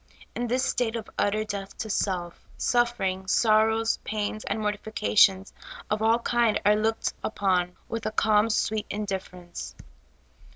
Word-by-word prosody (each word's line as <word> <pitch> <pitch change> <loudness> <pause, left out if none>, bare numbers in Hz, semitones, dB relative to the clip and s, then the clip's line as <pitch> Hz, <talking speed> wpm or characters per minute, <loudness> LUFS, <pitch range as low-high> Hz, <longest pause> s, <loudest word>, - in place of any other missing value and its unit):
In 245 - -2
this 255 +3 +1
state 245 -4 0
of 225 -2 -5
utter 215 +1 +1
death 200 -2 -6
to 220 - -4
self, 180 -4 -2
suffering, 215 -6 0
sorrows, 220 +2 +3
pains, 215 0 -3
and 220 - -2
mortifications 210 -2 +2 0.4
of 210 0 0
all 225 +1 +4
kind 235 -2 +1
are 210 +1 +6
looked 220 +1 0
upon 185 -4 0
with 230 -1 -4
a - - -2
calm, 215 0 +3
sweet 215 0 0
indifference. 190 -4 -5
215 Hz, 135 wpm, -26 LUFS, 195-225 Hz, 0.4 s, are